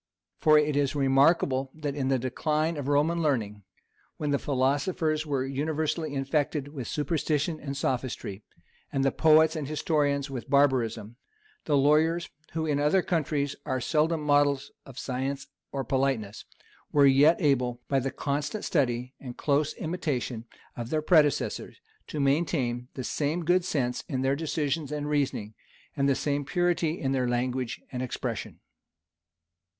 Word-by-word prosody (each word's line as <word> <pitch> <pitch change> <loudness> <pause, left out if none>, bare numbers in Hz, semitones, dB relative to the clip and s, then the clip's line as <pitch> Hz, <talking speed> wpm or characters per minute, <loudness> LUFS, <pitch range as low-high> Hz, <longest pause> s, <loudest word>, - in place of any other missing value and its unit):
For 155 -1 +6
it 150 -1 +2
is 145 0 +1
remarkable, 135 -1 +3
that 150 -2 -3
in 135 -2 -2
the 135 0 +2
decline 150 +6 -1
of 145 -3 -4
Roman 150 +4 +2
learning, 110 -9 -1 0.6
when 150 -2 -2
the 140 - +2
philosophers 150 +4 0
were 135 -3 0
universally 155 +2 -2
infected 145 +1 -1
with 135 -6 -6
superstition 155 0 -1
and 140 -2 -5
sophistry, 125 -7 -3 0.5
and 135 0 0
the 135 - +3
poets 160 0 +5
and 150 -3 -3
historians 145 -2 0
with 135 -1 -7
barbarism, 120 -5 +1 0.5
the 145 -2 +2
lawyers, 155 +4 +3 0.2
who 160 0 -1
in 145 -2 0
other 150 +6 +3
countries 145 -4 -1
are 130 - -1
seldom 155 +4 +1
models 145 -2 +2 0.2
of 135 -2 -12
science 135 +2 -3 0.3
or 135 -1 -2
politeness, 130 -5 -1 0.5
were 145 -1 +5
yet 140 +5 +5
able, 125 -6 +1
by 135 - +2
the 135 +1 -2
constant 145 +10 -3
study 125 -4 0
and 125 -3 -8
close 145 +1 +1
imitation 140 -9 -3 0.3
of 120 -1 -5
their 155 +1 0
predecessors, 155 -4 +2 0.3
to 150 - -5
maintain 135 -4 0
the 130 - -4
same 155 +6 -1
good 175 +2 +3
sense 135 -9 -1
in 130 -2 -1
their 135 +1 +2
decisions 150 -1 -2
and 150 -1 -3
reasonings, 140 -8 -1 0.4
and 140 -2 +2
the 135 - +3
same 145 +1 -1
purity 175 0 0
in 135 - -1
their 130 -2 +1
language 125 0 -2
and 125 -2 -4
expression. 130 - -4
145 Hz, 150 wpm, -28 LUFS, 130-155 Hz, 0.6 s, For